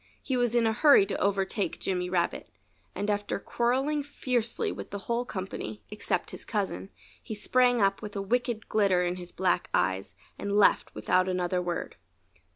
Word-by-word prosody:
He 265 - -1
was 245 -1 +1
in 235 -1 +4
a 220 - +2
hurry 280 -4 +6
to 200 - -3
overtake 200 0 0
Jimmy 180 -1 -2
Rabbit. 175 -2 -1 0.5
And 205 - -2
after 205 0 -1
quarreling 265 +8 0
fiercely 250 -5 -1
with - - -7
the 200 - -4
whole 235 +1 0
company 185 - -6
except - - -2
his - - -5
cousin 95 +2 -3 0.3
he 220 - -6
sprang 245 +1 +3
up 195 0 +2
with 210 -1 -7
a 200 - -1
wicked 235 0 -1
glitter 195 -4 +3
in 175 +1 -1
his 180 -1 -9
black 180 -1 0
eyes 95 +2 0 0.2
and 200 0 -2
left 210 - +4
without 185 +1 +2
another 180 0 0
word. 175 -1 -4
200 Hz, 170 wpm, -28 LUFS, 180-235 Hz, 0.5 s, hurry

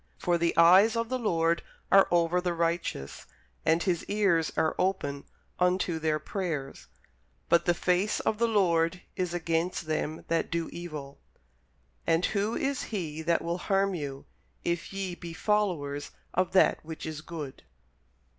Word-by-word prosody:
For 175 -1 +1
the 170 0 +1
eyes 185 +7 +7
of 230 0 -1
the 255 0 -1
Lord 170 -6 +1 0.3
are 195 0 +7
over 175 +1 +2
the 175 -1 -1
righteous, 165 - -2 0.4
and 165 +2 +3
His 175 -4 0
ears 195 -6 +2
are 160 - +2
open 180 -7 -1 0.3
unto 180 -2 +1
their 155 -1 +1
prayers: 155 -4 -4 0.6
but 170 0 +4
the 175 - +3
face 180 +4 +1
of 215 - -1
the 235 - +3
Lord 180 -5 +2
is 180 -2 -2
against 170 +1 -1
them 155 0 -2
that 165 0 0
do 165 -1 -2
evil. 150 -5 -7 0.9
And 165 +2 +3
who 210 +2 0
is 275 0 -1
he 160 -7 -4
that 170 +1 +1
will 170 +1 -2
harm 195 +1 +1
you, 140 -5 -5 0.4
if 170 -1 -2
ye 195 -2 -3
be 170 -1 -8
followers 165 -8 0 0.2
of 185 0 0
that 190 - +4
which 160 0 -7
is 155 -1 -5
good? 155 -5 -7
170 Hz, 155 wpm, -29 LUFS, 160-190 Hz, 0.9 s, eyes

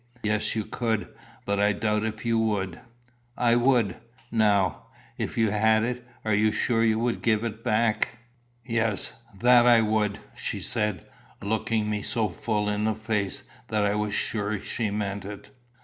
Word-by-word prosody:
"Yes, 105 +1 0
you 110 -2 -1
could; 115 -3 -2 0.4
but 100 0 0
I 105 +1 +3
doubt 105 0 0
if 110 0 -4
you 115 -1 +2
would." 100 -6 -1 0.6
"I 120 -1 +3
would." 120 -5 +3 0.3
"Now, 105 -5 +2 0.3
if - - -3
you 110 -2 +3
had 110 +1 +3
it, 125 +1 -2 0.2
you 110 0 +3
are - - -2
sure 115 +1 +1
you 110 -1 +3
would 120 +1 -1
give 110 -1 +2
it 115 -1 -5
back?" 110 +1 +1 0.5
"Yes, 115 -4 0 0.3
that 120 0 +6
I 120 -2 +7
would," 105 -2 +1 0.2
she - - -3
said, 105 -6 0 0.3
looking 110 +1 -1
me 105 -1 -1
so 110 0 0
full 105 +4 -1
in 105 +1 0
the 110 -1 +1
face 105 -3 -2 0.2
that 105 -1 0
I 100 - +2
was 105 0 -1
sure 105 -1 -1
she 110 +2 -2
meant 100 -1 -3
it. 100 +1 -9
110 Hz, 165 wpm, -26 LUFS, 105-115 Hz, 0.6 s, I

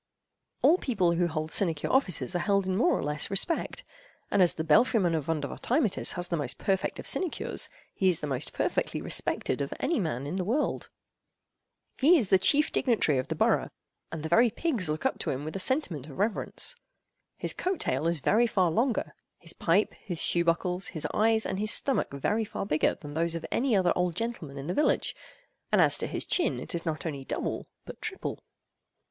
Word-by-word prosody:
All 350 +4 +5
people 190 -9 +1
who 175 +1 +1
hold 155 -1 -4
sinecure 165 -6 0
offices 190 - +1
are - - +1
held 200 +1 +1
in 185 0 -1
more 260 - +3
or - - -3
less 150 0 0
respect, 200 - -1 0.5
and 200 - +3
as 175 - +4
the 160 - -2
belfry—man 175 - +3
of 155 -4 -2
Vondervotteimittiss 180 - 0
has 175 0 -3
the 175 - -1
most 140 -4 -3
perfect 190 -1 -1
of - - -8
sinecures, 365 -4 -1 0.2
he 190 - +1
is 175 - +3
the - - -4
most 135 -1 -3
perfectly - - -1
respected - - -1
of - - -3
any 335 - 0
man 145 - -2
in 160 +6 -3
the 185 - -1
world. 245 +11 -1 1.1
He 325 +6 +6
is 225 -10 0
the 190 - +5
chief 295 +10 +3
dignitary 195 - +2
of 130 - -3
the - - -3
borough, - - +2 0.4
and 160 -2 -5
the - - -2
very 230 +8 +5
pigs 230 - -1
look 155 +1 -3
up - - 0
to - - -3
him 140 +2 -3
with 155 - -6
a - - -2
sentiment 185 - 0
of 140 - -11
reverence. 215 - -1 0.6
His - - +1
coat 370 0 -2
tail 135 +5 0
is 170 0 +1
very 220 - +3
far 185 -6 +2
longer—his 220 -6 -2
pipe, 180 +6 +1
his 175 -4 -6
shoe 170 - +3
buckles, 180 +2 0
his 155 - -4
eyes, 220 +1 +2
and 190 - -3
his 215 +1 +1
stomach, 270 +3 +3
very 205 +11 0
far 205 - -5
bigger—than 150 -4 -1
those 165 +2 0
of 165 - -5
any 250 -2 +1
other 180 -3 +3
old 180 -2 0
gentleman 185 -10 -4
in 135 - -6
the 175 - -2
village; 300 - +1 0.6
and - - +4
as - - +5
to - - -1
his - - -4
chin, 350 - +1
it - - -8
is 170 -1 -4
not 155 0 -3
only 140 -4 -4
double, - - -4 0.2
but - - -10
triple. 435 -3 -5
180 Hz, 200 wpm, -28 LUFS, 160-225 Hz, 1.1 s, He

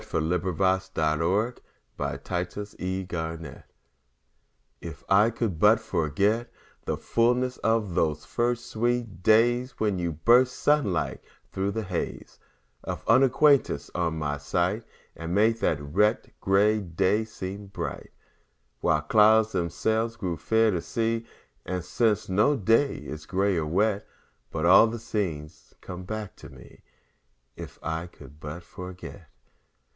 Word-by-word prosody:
Paul - - 0
Laurence 95 +3 0
Dunbar 85 +9 +1 0.4
If - - -27 0.3
I 90 0 -1
Could 105 +3 -6
But - - -23
Forget 90 -3 -5 1.2
IF 80 -3 -9
I 105 +3 +5
could 110 -7 -3
but 105 +4 +6
forget 100 +9 0 0.3
The - - -2
fullness 125 +2 +1
of 110 -4 0
those 75 -2 0
first 120 0 -1
sweet 115 -4 -2
days, 120 +5 +3
When 105 -4 0
you 85 -2 -2
burst 125 - +4
sun 145 -8 +2
like 85 - -2 0.3
thro' 95 +1 -1
the 110 +2 -3
haze 90 -3 -5 0.4
Of - - -5
unacquaintance, 130 - +3
on 85 -2 -1
my 75 -2 -2
sight, 90 - -1 0.3
And 85 +2 -4
made 110 +2 +3
the 80 - +2
wet, 105 +10 +1
gray 105 +3 +3
day 95 +3 0
seem 100 -2 -7
bright 85 -6 -6 0.7
While 75 - +2
clouds 110 +6 +4
themselves 110 +6 -1
grew 95 -6 -3
fair 110 +7 +2
to 90 -3 -1
see. 115 +1 -2 0.4
And 90 -1 -4
since, 105 +2 +1
no 105 +10 +3
day 115 +7 +2
is 75 0 -8
gray 95 +1 +1
or 80 -2 -1
wet 100 +5 0 0.4
But 80 +3 -2
all 95 +6 +7
the 115 +1 -4
scene 100 -10 -3 0.3
comes 90 0 -8
back 110 -2 -5
to - - -12
me, 65 -3 -16 0.7
If - - -9
I 80 +1 -3
could 75 -3 -15
but 75 +3 -7
forget. 90 0 -10
95 Hz, 140 wpm, -26 LUFS, 85-110 Hz, 1.2 s, all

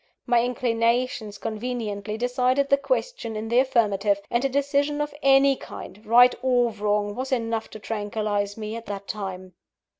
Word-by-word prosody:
My 240 -2 +3
inclinations 235 -2 0
conveniently 215 -2 -4
decided 250 +3 +1
the 280 - +5
question - - -2
in 215 +1 -4
the 240 +2 +4
affirmative; 210 -6 +2
and 240 +1 +1
a 275 - +2
decision 285 +2 0
of 295 0 -2
any 275 0 +5
kind, 210 -4 -10
right 245 +2 +7
or 245 -2 +2
wrong, 210 -1 -1
was 260 +4 -5
enough 230 -3 -1
to - - -9
tranquillise 205 -1 -2
me 215 0 -5
at 230 0 -8
that 200 -1 -6
time. 185 -3 -6
230 Hz, 155 wpm, -25 LUFS, 210-255 Hz, -, right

